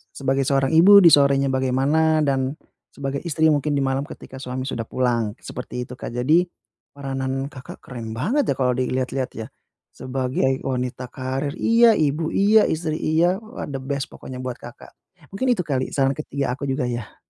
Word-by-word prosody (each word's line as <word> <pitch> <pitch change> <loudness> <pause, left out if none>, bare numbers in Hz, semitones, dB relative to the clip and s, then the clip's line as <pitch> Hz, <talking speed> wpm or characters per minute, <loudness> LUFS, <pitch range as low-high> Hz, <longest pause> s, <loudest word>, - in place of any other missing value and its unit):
sebagai 135 0 0
seorang 135 -2 +2
ibu 195 +5 +8
di 170 - +9
sorenya 140 -1 +4
bagaimana 140 +5 +2
dan 135 -1 0 0.4
sebagai 140 0 -4
istri 160 0 +3
mungkin 145 0 0
di 140 - +1
malam 135 +1 0
ketika 130 - -10
suami 130 0 -4
sudah 115 -4 -3
pulang, 115 -4 0
seperti 125 0 -6
itu - - -9
Kak. - - -6
Jadi, 155 +9 +3 0.5
peranan 135 -1 -3
Kakak 130 -3 -11
keren 115 -3 -7
banget 235 - 0
ya, 140 - +1
kalau 125 -1 +2
dilihat-lihat 130 +1 -2
ya. 110 -1 -5 0.4
Sebagai 130 0 -1
wanita 125 -1 -3
karir 130 +2 -3
iya, 230 0 +5
ibu 155 +1 0
iya, 210 +2 +5
istri 160 -1 -2
iya. 170 +4 +2
Wah 225 +2 -8
the 135 -1 -4
best 140 0 -3
pokoknya 130 -1 -9
buat 125 -1 -4
Kakak. 120 0 -12 0.4
Mungkin 255 +6 +1
itu 230 - -7
kali 130 -3 -2
saran 135 -1 +1
ketiga 140 -4 -3
aku 140 - -10
juga 135 -1 -1
ya. 120 -3 -5
135 Hz, 175 wpm, -22 LUFS, 130-155 Hz, 0.5 s, di